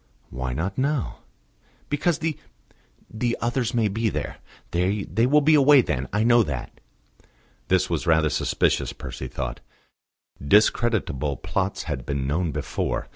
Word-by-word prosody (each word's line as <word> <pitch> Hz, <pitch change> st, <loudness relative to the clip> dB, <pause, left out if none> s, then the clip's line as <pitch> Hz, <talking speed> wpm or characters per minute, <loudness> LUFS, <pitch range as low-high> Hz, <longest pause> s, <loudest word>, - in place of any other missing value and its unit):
"Why 65 Hz, -1 st, -3 dB
not 90 Hz, -, -3 dB
now?" 140 Hz, -1 st, -1 dB, 0.7 s
"Because 150 Hz, +3 st, 0 dB
the 160 Hz, -2 st, -2 dB, 0.7 s
the 115 Hz, +2 st, -2 dB
others 120 Hz, 0 st, -1 dB
may 115 Hz, -2 st, +3 dB
be 110 Hz, +3 st, 0 dB
there. -, -, -4 dB, 0.3 s
They 95 Hz, +4 st, 0 dB, 0.2 s
will 150 Hz, +3 st, +5 dB
be 155 Hz, +2 st, +4 dB
away 145 Hz, -1 st, +7 dB
then; 65 Hz, -, -2 dB
I 105 Hz, +1 st, +1 dB
know 120 Hz, +1 st, +5 dB
that." 70 Hz, -, -3 dB, 1.0 s
This 95 Hz, 0 st, +2 dB
was 85 Hz, 0 st, -2 dB
rather 80 Hz, -1 st, +3 dB
suspicious, -, -, 0 dB
Percy -, -, -7 dB
thought: -, -, -5 dB, 0.8 s
discreditable 95 Hz, -, +2 dB
plots 95 Hz, +7 st, -2 dB
had 75 Hz, -6 st, -4 dB
been 70 Hz, -1 st, -2 dB
known 80 Hz, +4 st, 0 dB
before. -, -, -3 dB
100 Hz, 135 wpm, -24 LUFS, 75-120 Hz, 1.0 s, away